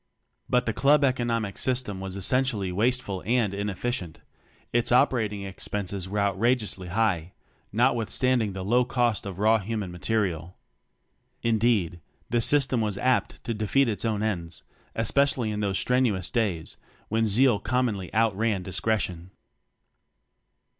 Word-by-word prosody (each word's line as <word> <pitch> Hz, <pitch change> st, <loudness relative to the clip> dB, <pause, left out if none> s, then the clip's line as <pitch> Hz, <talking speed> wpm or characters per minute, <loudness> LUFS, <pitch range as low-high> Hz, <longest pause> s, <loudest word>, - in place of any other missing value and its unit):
But 125 Hz, 0 st, +2 dB
the 110 Hz, -, -1 dB
club 145 Hz, +4 st, +4 dB
economic 120 Hz, -6 st, 0 dB
system 125 Hz, -7 st, 0 dB
was 95 Hz, 0 st, -5 dB
essentially 110 Hz, -2 st, +1 dB
wasteful 105 Hz, -1 st, 0 dB
and 115 Hz, -2 st, +1 dB
inefficient; 100 Hz, -2 st, -3 dB, 0.5 s
its 120 Hz, 0 st, +2 dB
operating 115 Hz, -6 st, +2 dB
expenses 95 Hz, -1 st, -4 dB
were 105 Hz, -, -3 dB
outrageously 100 Hz, -1 st, 0 dB
high, 95 Hz, -3 st, 0 dB, 0.4 s
notwithstanding 120 Hz, -1 st, +1 dB
the 95 Hz, -1 st, -5 dB
low 120 Hz, +5 st, +3 dB
cost 120 Hz, -4 st, 0 dB
of 95 Hz, -2 st, -7 dB
raw 110 Hz, +2 st, +3 dB
(human) 105 Hz, -2 st, -4 dB
material. 90 Hz, -3 st, -2 dB, 0.9 s
Indeed, 110 Hz, -7 st, +1 dB, 0.3 s
the 120 Hz, 0 st, +2 dB
system 135 Hz, -2 st, +3 dB
was 105 Hz, -3 st, -2 dB
apt 130 Hz, +1 st, 0 dB
to 115 Hz, -, -2 dB
defeat 110 Hz, +5 st, +1 dB
its 110 Hz, -3 st, -2 dB
own 110 Hz, -2 st, -1 dB
ends, 85 Hz, -8 st, -3 dB, 0.3 s
especially 120 Hz, 0 st, +1 dB
in 105 Hz, -, -3 dB
those 100 Hz, -2 st, 0 dB
strenuous 120 Hz, -8 st, 0 dB
days, 100 Hz, -9 st, -2 dB, 0.3 s
when 110 Hz, +1 st, +1 dB
zeal 115 Hz, +1 st, +4 dB
commonly 115 Hz, -6 st, -1 dB
outran 110 Hz, -2 st, +1 dB
discre 110 Hz, +4 st, 0 dB
tion. 90 Hz, -1 st, -5 dB
110 Hz, 130 wpm, -26 LUFS, 95-120 Hz, 0.9 s, club